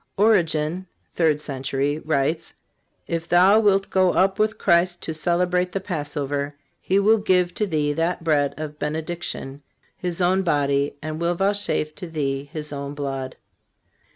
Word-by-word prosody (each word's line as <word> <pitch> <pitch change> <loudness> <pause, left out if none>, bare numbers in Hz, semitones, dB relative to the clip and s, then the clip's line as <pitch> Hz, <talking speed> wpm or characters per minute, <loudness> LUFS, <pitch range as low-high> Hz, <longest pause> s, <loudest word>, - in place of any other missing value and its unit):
Origen 180 -4 +2 0.3
(third 155 -3 +2
century) 140 0 -2
writes: 155 +1 -1 0.5
"If 165 0 -4
thou 185 +5 +6
wilt 195 -2 +2
go 185 -1 +3
up 195 +2 +2
with 215 +1 +1
Christ 175 -2 +2
to 160 - -3
celebrate 180 +2 +1
the 195 - -1
Passover, 145 -5 -3 0.3
He 190 - +1
will 215 +3 +4
give 180 -3 +2
to 210 - -1
thee 150 -4 0
that 165 +2 -1
bread 145 -3 +1
of 150 -1 -6
benediction, 155 -2 -4 0.3
His 175 -1 -4
own 185 +1 +3
body, 140 -5 +1
and 155 0 -4
will 170 +1 +1
vouchsafe 195 -5 0
to 180 - -8
thee 140 -3 -3
His 150 -2 -6
own 140 0 -5
blood." 135 -2 -4
165 Hz, 150 wpm, -23 LUFS, 145-185 Hz, 0.5 s, thou